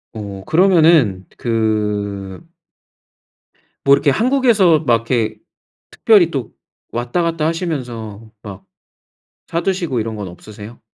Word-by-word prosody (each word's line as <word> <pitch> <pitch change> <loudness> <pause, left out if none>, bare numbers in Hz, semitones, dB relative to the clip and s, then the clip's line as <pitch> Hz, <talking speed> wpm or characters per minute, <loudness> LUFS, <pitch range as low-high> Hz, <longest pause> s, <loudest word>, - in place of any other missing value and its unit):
어 100 -3 -7
그러면은 160 - +3
그 105 - -2 1.4
뭐 140 - +6
이렇게 140 - +1
한국에서 225 - +3
막 120 -7 +2 0.2
이렇게 115 -3 0 0.5
특별히 190 -7 +3
또 130 -5 -5 0.4
왔다 120 +8 -2
갔다 165 -2 -1
하시면서 120 - -5
막 100 -3 -10 0.8
사두시고 170 - -2
이런 110 0 -4
건 100 -3 -6
없으세요? 105 +5 -12
120 Hz, 230 characters per minute, -18 LUFS, 105-165 Hz, 1.4 s, 뭐